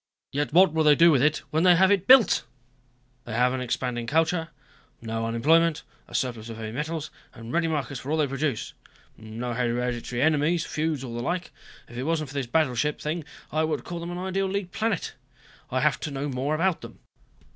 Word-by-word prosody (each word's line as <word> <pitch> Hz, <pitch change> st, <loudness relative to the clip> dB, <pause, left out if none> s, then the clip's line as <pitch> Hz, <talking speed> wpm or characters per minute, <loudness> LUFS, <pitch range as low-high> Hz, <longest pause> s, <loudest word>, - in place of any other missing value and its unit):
Yet 145 Hz, -2 st, -1 dB
what 175 Hz, +1 st, +5 dB
will 160 Hz, 0 st, +2 dB
they 150 Hz, -1 st, +6 dB
do 170 Hz, +3 st, +6 dB
with 135 Hz, -5 st, +3 dB
it 150 Hz, +2 st, +2 dB
when 155 Hz, -, +1 dB
they 180 Hz, 0 st, +6 dB
have 190 Hz, +3 st, +4 dB
it 195 Hz, -2 st, +1 dB
built? 255 Hz, -3 st, +6 dB, 0.8 s
They 120 Hz, -, -6 dB
have 125 Hz, +1 st, +3 dB
an 130 Hz, -, -2 dB
expanding 120 Hz, -1 st, -2 dB
culture, 160 Hz, +4 st, +1 dB, 0.5 s
no 115 Hz, 0 st, -3 dB
unemployment, 160 Hz, +8 st, +3 dB, 0.2 s
a -, -, -10 dB
surplus 120 Hz, -3 st, -2 dB
of 115 Hz, -, -7 dB
heavy 110 Hz, -1 st, -5 dB
metals 155 Hz, +4 st, -4 dB, 0.2 s
and 115 Hz, +1 st, -9 dB
ready 170 Hz, -1 st, +2 dB
markets 145 Hz, -4 st, -2 dB
for 135 Hz, -, -8 dB
all 155 Hz, -, +1 dB
they 155 Hz, -, +3 dB
produce. 135 Hz, -2 st, -2 dB, 0.4 s
No 115 Hz, +3 st, -6 dB
hereditary 120 Hz, +1 st, -1 dB
enemies, 155 Hz, +2 st, +2 dB
feuds 155 Hz, -3 st, -2 dB
or 120 Hz, -3 st, -6 dB
the 120 Hz, -, -3 dB
like. 175 Hz, +7 st, -3 dB, 0.4 s
If 120 Hz, -, -11 dB
it -, -, -2 dB
wasn't 155 Hz, -3 st, -1 dB
for -, -, -10 dB
this 140 Hz, -3 st, -2 dB
battleship 150 Hz, 0 st, +1 dB
thing, 155 Hz, +1 st, -3 dB, 0.3 s
I 155 Hz, +1 st, +1 dB
would 160 Hz, 0 st, -1 dB
call 175 Hz, -1 st, -6 dB
them 170 Hz, +1 st, -6 dB
an 175 Hz, -, -5 dB
ideal 190 Hz, +1 st, -1 dB
League 190 Hz, -1 st, -3 dB
planet. 220 Hz, -4 st, -2 dB, 0.6 s
I -, -, 0 dB
have -, -, +2 dB
to -, -, -4 dB
know 140 Hz, +1 st, -3 dB
more 135 Hz, +3 st, -1 dB
about 175 Hz, +2 st, +1 dB
them." -, -, -11 dB
150 Hz, 205 wpm, -26 LUFS, 125-165 Hz, 0.8 s, they